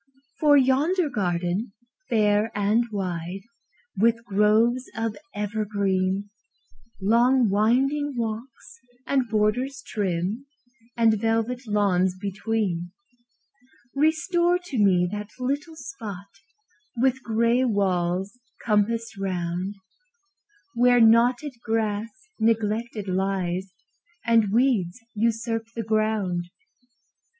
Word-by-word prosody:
For 295 -2 +6
yonder 290 +6 +2
garden, 185 0 -1 0.4
fair 215 -1 +2
and 210 +4 +2
wide, 180 -2 -4 0.5
With 230 +2 +2
groves 220 +4 +2
of 225 -1 -2 0.2
evergreen, 200 -2 -1 0.7
Long 235 +3 +3
winding 265 +7 +1
walks, 235 +6 -5 0.3
and 265 -4 0
borders 245 +5 0
trim, 200 +5 -2 0.5
And 220 -3 +3
velvet 225 +2 -1
lawns 190 -3 +2
between; 200 -3 -2 1.0
Restore 345 +4 +2
to 355 -9 -5
me 185 -3 +4
that 210 0 -5
little 285 +6 -3
spot, 215 - -8 0.7
With 260 +2 +1
gray 235 +2 +2
walls 190 -1 0 0.3
compassed 225 0 0
round, 180 0 -3 1.0
Where 245 0 +4
knotted 240 +5 +4
grass 220 -1 -1 0.3
neglected 220 -1 0
lies, 190 -1 -1 0.5
And 225 -4 +3
weeds 230 -5 +1
usurp 225 +1 -1
the 230 - -3
ground. 215 -5 0
220 Hz, 90 wpm, -25 LUFS, 195-245 Hz, 1.0 s, For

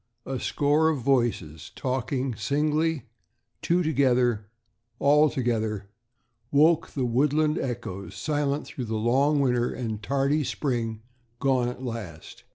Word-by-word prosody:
A 135 -1 -3
score 150 +2 +2
of 150 -5 -1
voices, 120 - 0
talking 130 0 -2
singly, 150 +5 0 0.6
two 175 +1 +2
together, 125 -7 +2 0.5
all 150 +3 +4
together, 110 -6 -2 0.6
woke 155 +3 +4
the 130 -3 -2
woodland 150 +5 +2
echoes, 100 -7 -5
silent 145 +5 -1
through 125 - -6
the 110 0 -3
long 135 +7 +2
winter 125 -2 +1
and 110 -4 -4
tardy 140 +5 +1
spring, 115 -6 -2 0.3
gone 130 -2 +1
at 125 +1 -6
last. 105 -10 -7
130 Hz, 120 wpm, -26 LUFS, 115-145 Hz, 0.6 s, all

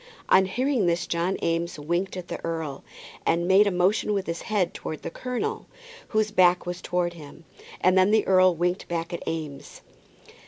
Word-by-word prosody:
On 190 0 +6
hearing 250 -1 0
this 170 0 +1
John 170 +3 -1
Eames 170 0 -1
winked 175 +6 -2
at 180 -1 -7
the - - -6
earl, 160 -4 -4 0.4
and 170 +1 +1
made 195 +2 +6
a - - +2
motion 190 +4 +1
with 195 -2 -1
his 170 0 -4
head 195 -5 0
towards 155 - -6
the - - -5
colonel, 255 - -4 0.4
whose 215 -1 0
back 180 -3 +4
was 175 0 -5
turned 175 -1 -1
to 170 - -14
him. 150 +2 -13 0.4
And 185 +1 +4
then 185 +1 +5
the 215 0 +3
earl 185 -1 +5
winked 175 +3 -1
back 170 0 -3
at 170 - -4
Eames. 155 -4 -6
180 Hz, 190 wpm, -25 LUFS, 170-195 Hz, 0.4 s, On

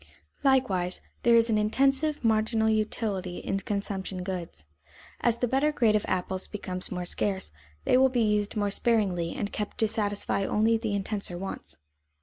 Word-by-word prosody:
Likewise, 205 -10 +2 0.2
there 235 -1 +5
is 230 0 +4
an 215 - +3
intensive 270 +7 +2
marginal 220 0 +2
utility 210 -4 -1
in 195 - -2
consumption 195 -2 -3
goods. 180 - -6 0.5
As 235 -1 +2
the 245 - 0
better 270 +5 +2
grade 230 -7 +3
of 210 - +1
apples 185 0 -1
becomes 185 -3 -4
more 180 -1 -3
scarce, 190 - -1 0.3
they - - +4
will 265 0 +5
be 245 -2 +1
used 210 -1 +1
more 205 -1 0
sparingly 195 -7 +1
and 205 - -3
kept 210 -1 -4
to 225 -3 +3
satisfy 205 -2 -1
only 220 +3 +2
the 220 -2 -1
intenser 200 -2 -3
wants. 175 - -7
210 Hz, 160 wpm, -28 LUFS, 190-230 Hz, 0.5 s, there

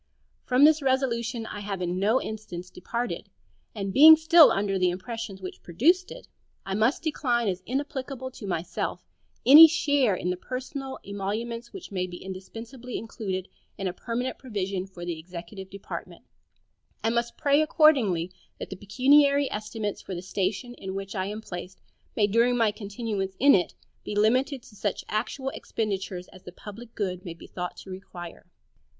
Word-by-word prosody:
From 255 +2 +4
this 310 0 +5
resolution 245 -3 0
I 205 - -6
have 200 -2 -4
in 180 0 -2
no 215 +6 +3
instance 180 -6 -7
departed; 235 +7 -4 0.5
and 195 -2 -3
being 315 +3 +10
still 320 +1 +7
under 195 -1 0
the 180 0 +3
impressions 195 +1 -6
which 185 - -7
produced 330 - +2
it, - - -10 0.4
I 195 - -3
must 220 +10 +1
decline 245 -7 0
as 185 -2 -1
inapplicable 265 -1 -3
to 215 -5 -9
myself 175 -2 -3 0.4
any 305 +5 +12
share 285 - +2
in 180 0 -2
the 180 - -3
personal 265 +4 -5
emoluments 220 +4 -4
which 375 - -9
may 185 -2 -1
be 175 -1 -8
indispensably 225 +7 -8
included 195 -5 -4 0.3
in 195 - -4
a 180 - -2
permanent 245 +5 -3
provision 195 -6 -3
for 180 -2 -9
the 170 -2 -4
executive 180 +3 -9
department, 200 0 -8 0.8
and 225 +1 +2
must 235 0 -1
accordingly 280 - +4
pray 180 - -28 0.2
that - - -7
the 190 - -5
pecuniary 280 +6 +4
estimates 210 -1 -4
for 190 - -6
the 175 - -6
station 195 +6 -2
in 190 0 -5
which 195 0 -5
I 190 -2 -2
am 210 +2 -5
placed 180 -2 -8 0.4
may 210 - +4
during 235 +4 +3
my 225 -3 +3
continuance 205 -2 -4
in 280 +2 +6
it 180 -3 +2 0.3
be 210 - -5
limited 250 +5 +2
to 210 - -16
such 205 -1 -3
actual 255 +5 -2
expenditures 195 -7 -4
as 185 - -15
the 180 - -10
public 220 +5 -11
good 185 -3 -3
may 170 -4 -7
be - - -13
thought 180 -1 -6
to 190 - -10
require. 175 -2 -9
215 Hz, 170 wpm, -27 LUFS, 190-255 Hz, 0.8 s, any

